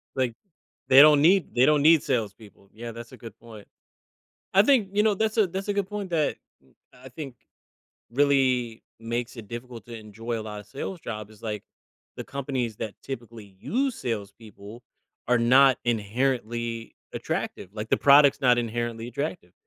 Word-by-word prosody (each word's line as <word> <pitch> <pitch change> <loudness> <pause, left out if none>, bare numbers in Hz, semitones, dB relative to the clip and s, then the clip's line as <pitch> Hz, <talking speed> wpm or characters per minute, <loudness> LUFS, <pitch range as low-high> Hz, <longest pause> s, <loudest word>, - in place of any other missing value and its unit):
Like, 130 -3 0 0.6
they 135 +1 +9
don't 150 -1 +7
need 180 0 +3
they 125 +1 +5
don't 150 0 +4
need 160 0 +5
salespeople. 105 -5 -4
Yeah, 115 +2 -8
that's 115 0 -10
a - - -11
good 115 -2 -11
point. 110 -3 -13 0.9
I 195 - +7
think, 225 -4 +3
you 210 +1 +3
know, 215 -2 +3
that's 220 +2 -1
a 215 -3 +4
that's 190 +3 -5
a 205 - 0
good 200 -2 -1
point 205 -3 -5
that 155 -3 0 0.3
m 65 - -27 0.2
I 130 +1 -14
think 135 -1 -8 0.8
really 130 -4 +1 0.2
makes 120 +2 -4
it 110 -4 -10
difficult 120 -1 -8
to 120 -1 -8
enjoy 110 +2 -6
a - - -5
lotta 105 -1 -8
sales 170 - -7
jobs 110 -4 -7
is, 110 +1 -19
like, 105 -2 -5 0.5
the - - -6
companies 130 -5 -4
that 105 -1 -5
typically 115 -6 -9
use 260 - -1
salespeople 105 - -7 0.5
are 125 -1 +4
not 130 +2 +5
inherently 115 0 -2 0.2
attractive. - - -4
Like 110 0 -5
the - - +4
product's 140 0 +6
not 125 -2 +4
inherently 120 0 -3
attractive. 140 - -5
120 Hz, 170 wpm, -26 LUFS, 115-145 Hz, 0.9 s, they